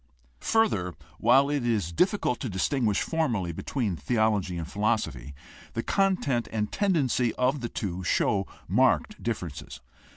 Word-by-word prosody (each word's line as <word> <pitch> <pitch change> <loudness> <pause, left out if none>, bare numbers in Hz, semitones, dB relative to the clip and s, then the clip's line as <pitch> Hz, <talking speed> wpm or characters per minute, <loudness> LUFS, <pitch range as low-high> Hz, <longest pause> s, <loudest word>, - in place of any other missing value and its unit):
Further, 100 - +1 0.2
while 135 +3 +5
it 145 -3 0
is 110 -8 0
difficult 180 - +1
to 130 - -3
distinguish 105 +3 +1
formally 120 - -1
between 105 - -2
theology 105 - 0
and 80 -1 -4
philosophy, 105 - -1 0.4
the 115 - -2
content 180 - +1
and 105 -1 -2
tendency 145 - +1
of 130 +2 +1
the 120 - -3
two 95 -3 -4
show 95 +3 +1 0.2
marked - - +2
differences. 90 - -5
115 Hz, 130 wpm, -27 LUFS, 95-135 Hz, 0.4 s, while